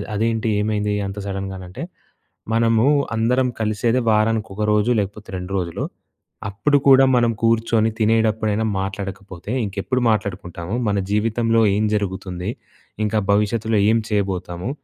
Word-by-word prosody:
"అదేంటి 110 +1 0
ఏమైంది 105 -1 0
అంత 95 +1 -7
సడన్‍గా" 95 -1 -4
అనంటే 90 0 -8 0.7
మనము 115 0 +3 0.3
అందరం 125 +3 +2
కలిసేదే 110 +3 +1
వారానికి 110 0 +1
ఒక 105 - -2
రోజు 105 +3 +2
లేకపోతే 105 +2 -5
2 90 +1 -7
రోజులు 85 -3 -3 0.7
అప్పుడు 145 +9 +2
కూడా 135 0 +8
మనం 120 -1 +3
కూర్చొని 115 -1 +2
తినేటప్పుడైనా 110 -1 +1
మాట్లాడకపోతే 95 -1 -6
ఇంకెప్పుడు 100 +6 -2
మాట్లాడుకుంటాము. 95 -3 -3
మన 100 -1 +1
జీవితంలో 115 +2 +2
ఏం 105 - +1
జరుగుతుంది? 95 -2 -3 0.5
ఇంకా 105 +1 0
భవిష్యత్తులో 105 +2 +1
ఏం 115 - +4
చేయబోతాము? 95 -2 -2
105 Hz, 120 wpm, -21 LUFS, 100-115 Hz, 0.7 s, కూడా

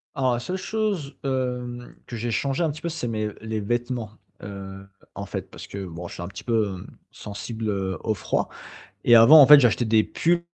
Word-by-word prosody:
Alors 130 -3 +1
la 120 - -1
seule 180 +9 -4
chose, 200 -8 -2
hem, 125 -2 -3
que 120 - -7
j'ai 115 +1 -3
changé 135 +7 0
un 160 - +1
petit 150 - -10
peu, 170 - -2
c'est 155 -6 -4
mes 110 -2 -2
les 110 -1 -3
vêtements, 120 +1 -2 0.3
heu, 95 -1 -8 0.3
en - - -5
fait - - -6
parce - - -10
que 100 -1 -6
bon 85 0 -7
je - - -10
suis 85 - -6
un - - -5
petit 95 +2 -9
peu, 110 -3 +1
hem, 90 - -10 0.2
sensible, 110 +2 -6
heu, 95 -2 -2
au 110 - +1
froid 100 - -2 0.6
et 120 - +6
avant 120 +7 +9
en 140 - +9
fait 150 +1 +10
j'achetais 120 -1 +3
des 110 -1 +4
pulls 170 +1 0
120 Hz, 215 wpm, -24 LUFS, 105-135 Hz, 0.6 s, fait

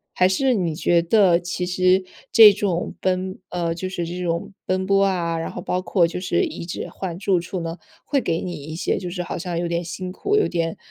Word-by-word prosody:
还 185 - +4
是 260 +7 +2
你 175 -7 -1
觉 170 +1 +3
得 175 -1 +4
其 180 0 -3
实 185 +1 +2 0.3
这 215 -3 +9
种 185 -4 -2
奔 185 0 -1
呃， 170 -2 -1
就 185 +2 -4
是 175 -3 -3
这 180 +2 -5
种 170 +3 -2
奔 185 0 0
波 195 0 +3
啊， 170 -4 0
然 165 - -3
后 - - -7
包 180 +1 -2
括 185 -2 +2
就 170 +2 -3
是 195 - +1
一 310 - -5
直 175 - -4
换 175 -3 -5
住 190 -1 +1
处 175 +2 -5
呢， 165 +1 -5 0.3
会 275 -3 +1
给 165 -5 -1
你 180 - -4
一 155 +2 -7
些 165 - -1
就 180 - -5
是 180 0 -4
好 175 - -5
像 175 -1 -3
有 175 - -1
点 170 0 -1
辛 180 +2 -5
苦， 405 - -1
有 420 - +3
点 165 -1 -2
180 Hz, 250 characters per minute, -22 LUFS, 170-190 Hz, 0.3 s, 这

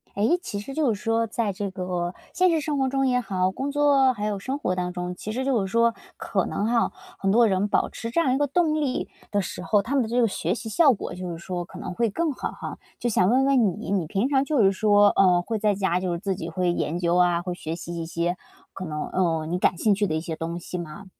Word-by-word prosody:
诶， 220 - +3
其 205 - -5
实 270 +7 -7
就 285 -7 +2
是 205 - -8
说 225 0 +1
在 215 -2 -1
这 200 0 -3
个 180 -1 -3 0.2
现 365 0 +4
实 330 -2 +2
生 295 -1 -2
活 265 -1 +2
中 270 0 +1
也 250 -1 +2
好， 185 -4 0
工 270 +8 -3
作 280 -2 +4
还 210 -3 -4
有 210 -2 -2
生 260 +7 -3
活 185 -10 -1
当 180 0 -2
中， 180 0 -4
其 215 - -6
实 255 +4 -2
就 260 -5 +2
是 195 - -2
说 230 +1 +3 0.2
可 - - -1
能 205 - -2
哈， 230 +1 +2 0.3
很 195 0 +1
多 235 +3 +5
人 195 0 +1
保 - - +1
持 230 - -6
这 240 - 0
样 260 -6 +2
一 - - +2
个 290 0 +1
动 315 +2 +2
力 270 -4 -1 0.2
的 205 -1 +2
时 180 - -6
候， 205 +3 +2
他 230 +7 -4
们 270 - +3
的 220 - -5
这 240 +2 +1
个 235 - +4
学 180 -2 -1
习 225 - -7
效 285 +6 +5
果 195 - -6
就 180 0 -6
是 165 - -5
说 175 +1 -4
可 180 +1 -12
能 - - -5
会 230 +4 +1
更 325 +9 -1
好 - - -4
哈。 - - -7 0.2
就 - - -1
想 185 -4 +3
问 260 +3 +4
问 245 -9 +3
你， - - -5
你 185 -5 0
平 195 +9 0
常 270 -2 +3
就 280 -5 +2
是 195 - +5
说， 205 +1 +4
嗯， 180 -2 +5
会 225 +3 -2
在 210 -1 +2
家 190 -2 +1
就 185 -1 -2
是 170 - -2
自 195 0 -2
己 170 -2 -5
会 180 +1 0
研 170 -1 -1
究 175 -1 +1
啊， 175 -1 +3
会 180 0 -4
学 165 -2 -5
习 170 0 -7
一 165 - -3
些 170 +1 -1 0.4
可 185 - -6
能， 150 -2 -4
嗯， 165 -3 0
你 180 - 0
感 180 - +2
兴 210 +4 +3
趣 205 +1 +1
的 155 - -1
一 - - 0
些 165 -1 -4
东 165 +2 -4
西 180 - -6
吗？ 175 +3 -7
200 Hz, 295 characters per minute, -25 LUFS, 180-245 Hz, 0.4 s, 多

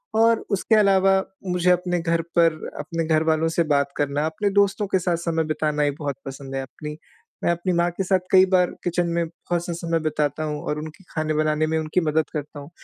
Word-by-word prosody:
और 225 +1 +4
उसके 200 +3 +2
अलावा 195 -2 +4 0.3
मुझे 180 0 +1
अपने 180 0 +1
घर 165 0 0 0.2
पर 165 -2 +3
अपने 165 -1 -3
घर 155 0 +3
वालों 160 0 +2
से 170 +1 +1
बात 140 0 +1
करना 145 +1 0
अपने 180 +6 -1
दोस्तों 200 0 +2
के 190 - +1
साथ 175 -2 0
समय 165 -1 -1
बिताना 155 -1 -1
ही 145 - +2
बहुत 145 -2 -3
पसंद 135 0 -7
है। 135 - -1
अपनी, 150 +3 -8 0.5
मैं - - +3
अपनी 175 +2 -1
माँ 170 0 +2
के 195 - -3
साथ 190 0 +2
कई 190 0 +7
बार 180 -1 +4
किचन 175 0 0
में 170 0 +1
बहुत-सा 175 +1 -4
समय 165 -1 -1
बिताता 155 -1 -1
हूँ 150 -1 -3
और 150 0 -1
उनकी 155 +5 -9
खाने 155 -1 -2
बनाने 155 0 +1
में 160 - 0
उनकी 155 +3 0
मदद 155 -1 0
करता 150 -1 -5
हूँ। 140 +1 -10
165 Hz, 215 wpm, -23 LUFS, 150-180 Hz, 0.5 s, कई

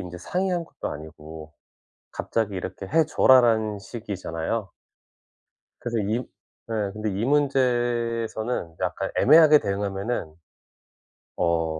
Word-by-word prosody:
인제 90 -1 -7
상의한 180 - -1
것도 - - -6
아니고 80 0 -10 0.6
갑자기 105 -3 -2
"이렇게 95 +1 -5
해 160 +7 +3
줘라."라는 115 -8 +4
식이잖아요. 100 -2 -4 1.1
그래서 120 -1 -2
이 105 +2 0 0.5
예. 105 -3 -1
근데 110 0 -3
이 100 +4 -2
문제에서는 120 - 0
약간 95 +1 -2
애매하게 155 +1 +7
대응하면은 100 -3 -3 1.0
어 85 -2 +1
110 Hz, 260 characters per minute, -25 LUFS, 95-120 Hz, 1.1 s, 애매하게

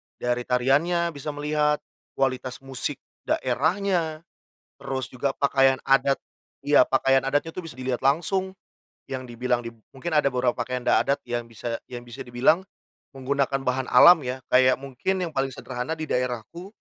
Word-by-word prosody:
dari 120 0 -2
tariannya 150 +8 +2
bisa 145 0 -6
melihat, 150 0 0 0.3
kualitas 130 -1 -2
musik 135 -2 -3 0.3
daerahnya, 160 +4 0 0.6
terus 130 -2 -3
juga 130 +2 -3
pakaian 135 -1 +3
adat 135 0 +3 0.5
iya, 145 -2 +6
pakaian 135 +1 +3
adatnya 145 +4 0
tuh 185 - -5
bisa 160 - -8
dilihat 130 -1 -2
langsung, 185 +7 0 0.5
yang 130 -1 -4
dibilang 120 +1 -1
di 115 - -7 0.2
mungkin 155 +4 -4
ada 140 -2 +3
beberapa 125 -1 +1
pakaian 125 +1 -3
da - - +4
adat 140 - 0
yang 120 0 -2
bisa 115 0 -5 0.2
yang 120 0 -8
bisa 120 - -8
dibilang 125 +9 +2 0.5
menggunakan 135 0 -1
bahan 130 0 0
alam 160 +4 +8
ya. 125 +1 -4
Kayak 130 +1 +4
mungkin 145 +8 -2
yang - - -8
paling 135 0 0
sederhana 125 +3 -5
di 160 - -6
daerahku, 125 - -3
135 Hz, 155 wpm, -25 LUFS, 125-150 Hz, 0.6 s, alam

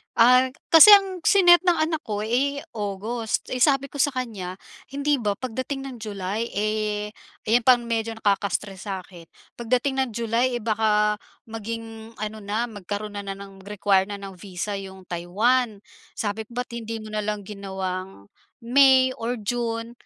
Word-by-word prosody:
Ah, 255 +2 +5 0.2
kasi 335 +6 +10
ang 385 -3 +3
si-net 360 -2 +6
ng 355 - +5
anak 315 0 0
ko, 210 -1 -3
eh, 275 +6 0 0.2
August, 210 +3 -3
eh, 255 - -2
sabi 275 +1 +3
ko - - -9
sa 285 0 +2
kanya, 215 -8 -4 0.4
hindi 285 0 +1
ba 210 -4 0
pagdating 260 +4 -5
ng 250 - -8
July, 210 0 -4
eh, 210 0 -1 0.4
ayan 235 0 +3
pang 250 -2 +6
medyo 230 -1 -2
nakaka-stress 200 -2 -1
sa 190 -2 -4
akin, 175 -2 -14 0.3
pagdating 250 +3 0
ng 265 -2 +1
July, 235 +2 0
eh, 240 - -2
baka 210 -1 +2 0.3
maging 225 0 -7
ano 215 0 -4
na, 225 +4 -1
magkaroon 205 0 -6
na 200 - -6
na 195 - -4
ng 195 -1 -12
require 200 -2 +2
na 200 -1 -7
ng 195 -2 -9
visa 200 +1 -5
yung 190 -1 -9
Taiwan. 205 +6 0 0.3
Sabi, 215 +1 -3
"Ba't 245 +2 -5
hindi 225 -1 -5
mo 215 - -9
na 215 -1 -3
lang 210 -1 -2
ginawang 190 - -6 0.3
May 260 +1 +5
or 235 +2 -2
June 230 0 -2
220 Hz, 160 wpm, -24 LUFS, 200-250 Hz, 0.4 s, kasi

